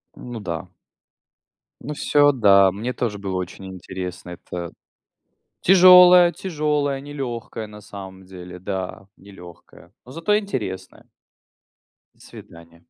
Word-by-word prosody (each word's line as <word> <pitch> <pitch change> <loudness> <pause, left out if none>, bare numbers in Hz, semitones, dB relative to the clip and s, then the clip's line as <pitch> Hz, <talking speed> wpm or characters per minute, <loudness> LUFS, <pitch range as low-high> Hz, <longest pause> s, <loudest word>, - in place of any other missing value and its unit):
Ну 120 -2 -8
да. 90 -1 -6 1.1
Ну 150 +4 -5
всё, 145 0 +3
да. 100 -6 +4
Мне 115 +6 -5
тоже 110 -4 -3
было 95 -2 -5
очень 90 +1 -7
интересно. 90 -1 -8
Это 85 0 -8 0.9
тяжелая, 180 -1 +7
тяжелая, 150 -6 -2
нелегкая 120 -6 -6
на 105 0 -13
самом 95 -2 -11
деле. 90 -1 -11
Да, 95 0 -6
нелегкая. 90 -3 -16
Но 125 - -13
зато 165 +8 0
интересная. 105 - -6 1.1
До - - -33
свидания. 85 0 -15
100 Hz, 110 wpm, -21 LUFS, 95-145 Hz, 1.1 s, тяжелая